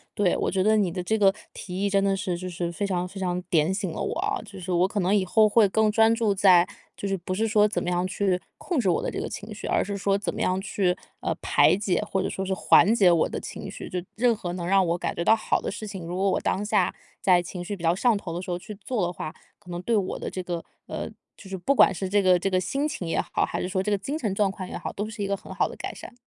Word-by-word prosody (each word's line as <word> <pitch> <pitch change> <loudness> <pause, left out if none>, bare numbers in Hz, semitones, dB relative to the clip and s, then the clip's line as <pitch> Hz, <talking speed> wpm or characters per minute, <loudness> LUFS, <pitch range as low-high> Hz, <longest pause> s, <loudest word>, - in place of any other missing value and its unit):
对， 195 -4 +2
我 - - 0
觉 190 -1 +1
得 215 +2 +4
你 200 -4 +2
的 180 +1 -4
这 220 +5 +1
个 195 -2 +5 0.2
提 185 +1 -5
议 200 - +2
真 195 0 +3
的 195 0 +2
是 185 -3 -2
就 185 - -6
是 175 -1 -3
非 200 +4 -2
常 180 -2 -1
非 190 +2 -8
常 180 -1 -1
点 160 +2 +3
醒 190 -3 -2
了 - - -5
我 - - -2
啊， - - -1
就 200 - -11
是 185 0 -5
我 180 +1 +3
可 205 0 -2
能 185 +2 +2
以 200 -3 +3
后 215 +3 +4
会 215 -1 +5
更 215 +2 +2
专 225 +1 +5
注 225 -3 +1
在 185 -3 +6 0.3
就 200 - -4
是 195 - 0
不 180 +1 -5
是 220 +4 +1
说 210 -1 +4
怎 210 - -2
么 180 - -2
样 180 0 0
去 185 -1 0 0.2
控 345 -6 -2
制 210 - 0
我 170 - +2
的 - - -1
这 - - -4
个 - - -3
情 210 +1 -7
绪， 205 - -8
而 - - +2
是 200 +1 -4
说 195 0 +1
怎 200 - -3
么 - - -6
样 185 +1 +1
去， 190 -2 0 0.3
呃， - - 0
排 - - +4
解， 195 -2 0
或 190 - 0
者 - - -1
说 190 - -4
是 190 - -1
缓 200 +1 +5
解 190 -6 +5
我 165 - +3
的 - - -5
情 - - -7
绪。 - - -8
就 180 - -2 0.2
任 240 +1 +3
何 175 -5 -5
能 175 -1 -4
让 195 0 +4
我 170 0 +1
感 - - -2
觉 170 - -2
到 220 - +6
好 220 - 0
的 - - -4
事 215 - -6
情， 190 -4 -7
如 175 +2 -5
果 195 +1 +1
我 - - +1
当 200 - -1
下 205 -3 +1 0.3
在 180 -2 +4
情 175 0 -7
绪 205 - -3
比 175 - -12
较 165 +1 +3
上 235 +4 +3
头 195 -4 -5
的 170 - -3
时 180 - -5
候 175 - -2
去 210 +3 -9
做 205 0 -2
的 175 - -3
话， 155 -2 -6 0.2
可 180 - -13
能 175 0 -4
对 225 +4 +1
我 190 -2 -2
的 - - -4
这 185 - -5
个 175 -2 -4 0.2
呃， - - -5 0.3
就 195 - -13
是 190 - -4
不 230 +10 +1
管 265 - +6
是 190 +1 -3
这 205 +2 +2
个 185 -2 +5
这 180 - -2
个 185 - +2
心 280 - -1
情 190 - -5
也 165 - 0
好， - - 0
还 - - -2
是 - - -2
说 190 0 -1
这 200 - -2
个 205 - +3
精 280 +10 -4
神 215 -9 -1
状 200 -1 +2
况 190 -2 -7
也 - - -5
好， - - -5
都 210 +2 -4
是 215 -2 -5
一 - - -1
个 200 - 0
很 - - -10
好 - - +1
的 - - -9
改 - - -5
善。 - - -10
195 Hz, 335 characters per minute, -26 LUFS, 180-205 Hz, 0.3 s, 在